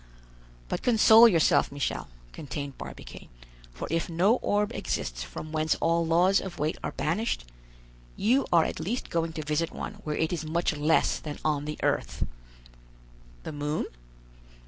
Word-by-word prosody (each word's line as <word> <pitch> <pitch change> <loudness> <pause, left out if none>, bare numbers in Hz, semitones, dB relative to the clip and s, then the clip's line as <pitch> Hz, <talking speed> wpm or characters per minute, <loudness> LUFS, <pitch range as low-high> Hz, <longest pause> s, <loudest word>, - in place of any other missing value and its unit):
"But - - -3
console 225 -1 +7
yourself, 165 -9 +3
Michel," 140 - -3 0.3
continued 140 -1 -6
Barbicane, - - -10 0.4
"for - - -6
if 165 +1 0
no 185 +8 +3
orb 205 0 0
exists - - -3
from 65 - -7
whence 155 0 +1
all 170 +1 +1
laws 175 +4 +3
of 190 - -7
weight 155 +2 -1
are - - -3
banished, 175 - -1 0.7
you 250 +6 +2
are 170 -2 +6
at - - -4
least 210 +10 -3
going 165 -1 0
to 155 - -4
visit 150 +3 0
one - - -7
where 150 -1 -3
it 160 +2 0
is 165 -2 -2
much 160 +1 0
less 150 +2 +2
than 150 -2 -6
on 150 -2 +1
the 150 0 -4
earth." - - 0 1.2
"The - - -5
moon?" 150 +1 -2
160 Hz, 155 wpm, -28 LUFS, 150-180 Hz, 1.2 s, console